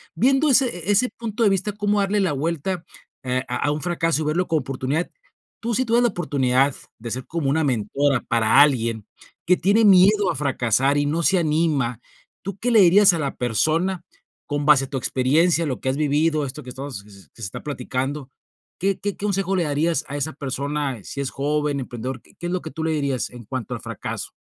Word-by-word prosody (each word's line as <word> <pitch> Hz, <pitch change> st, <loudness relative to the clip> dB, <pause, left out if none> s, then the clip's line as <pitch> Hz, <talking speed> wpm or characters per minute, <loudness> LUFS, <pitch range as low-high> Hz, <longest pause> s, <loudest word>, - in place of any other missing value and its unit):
viendo 270 Hz, +5 st, +3 dB
ese 265 Hz, 0 st, +5 dB
e 175 Hz, +3 st, -7 dB
e -, -, +5 dB
ese 235 Hz, +5 st, +3 dB
punto 230 Hz, -1 st, -5 dB
de 210 Hz, -, +5 dB
vista, 195 Hz, +2 st, 0 dB
cómo 205 Hz, 0 st, 0 dB
darle 200 Hz, +1 st, +1 dB
la 185 Hz, -6 st, +1 dB
vuelta, 165 Hz, +4 st, -2 dB, 0.4 s
eh, 130 Hz, 0 st, -1 dB
a -, -, -2 dB
a -, -, +2 dB
un 150 Hz, +1 st, -3 dB
fracaso 165 Hz, -1 st, 0 dB
y -, -, -2 dB
verlo 170 Hz, +4 st, 0 dB
como 160 Hz, -3 st, +1 dB
oportunidad, 135 Hz, +5 st, -2 dB, 0.5 s
tú 235 Hz, +1 st, -2 dB
sí 255 Hz, +4 st, +1 dB
tuvieras 235 Hz, +1 st, +3 dB
la 240 Hz, -, +4 dB
oportunidad 135 Hz, -, +1 dB, 0.2 s
de 115 Hz, +1 st, -6 dB
ser 130 Hz, +2 st, -4 dB
como 160 Hz, -4 st, -2 dB
una 160 Hz, +3 st, +1 dB
mentora 135 Hz, +1 st, 0 dB
para 115 Hz, +4 st, +4 dB
alguien 115 Hz, -7 st, +2 dB, 0.4 s
que 180 Hz, +2 st, +4 dB
tiene 200 Hz, +6 st, +3 dB
miedo 200 Hz, 0 st, +5 dB
a -, -, -5 dB
fracasar 135 Hz, -1 st, +1 dB
y 145 Hz, -, +1 dB
no 155 Hz, +4 st, 0 dB
se 190 Hz, +3 st, +4 dB
anima, 150 Hz, -7 st, 0 dB, 0.4 s
¿tú 195 Hz, 0 st, -5 dB
qué 245 Hz, -, 0 dB
le 225 Hz, -, +6 dB
dirías 195 Hz, +3 st, +7 dB
a 170 Hz, -, -2 dB
la 140 Hz, -3 st, -3 dB
persona 165 Hz, -, 0 dB, 0.4 s
con 145 Hz, -1 st, -2 dB
base 145 Hz, -2 st, +5 dB
a -, -, -14 dB
tu -, -, -6 dB
experiencia, 155 Hz, +7 st, +2 dB
lo 135 Hz, -4 st, -3 dB
que 130 Hz, -, -1 dB
has 130 Hz, -, -1 dB
vivido, 150 Hz, +1 st, +1 dB
esto 140 Hz, +3 st, -7 dB
que 130 Hz, -, -10 dB
estamos 130 Hz, -3 st, -7 dB
s -, -, -17 dB
s 90 Hz, -, -19 dB
que -, -, -16 dB
se -, -, -3 dB
está -, -, -8 dB
platicando? 135 Hz, 0 st, -4 dB, 0.5 s
¿Qué 195 Hz, +1 st, 0 dB
qué 205 Hz, -1 st, -2 dB
qué 205 Hz, -, -4 dB
consejo 195 Hz, -1 st, 0 dB
le 175 Hz, -, +1 dB
darías 155 Hz, +3 st, 0 dB
a 140 Hz, -, -6 dB
esa 145 Hz, +2 st, -2 dB
persona, 140 Hz, 0 st, -3 dB
eh, -, -, -16 dB
si -, -, -7 dB
es 135 Hz, -, -2 dB
joven, 145 Hz, 0 st, -1 dB
emprendedor? 125 Hz, +1 st, -6 dB
¿Qué -, -, -23 dB
qué 175 Hz, -, -4 dB
es -, -, -3 dB
lo 185 Hz, -, -1 dB
que -, -, -8 dB
tú 160 Hz, +4 st, -5 dB
le 160 Hz, -, 0 dB
dirías 140 Hz, -4 st, -1 dB
en 120 Hz, -1 st, -11 dB
cuanto 130 Hz, -1 st, -5 dB
al -, -, -8 dB
fracaso? -, -, -5 dB
150 Hz, 230 wpm, -22 LUFS, 135-180 Hz, 0.5 s, dirías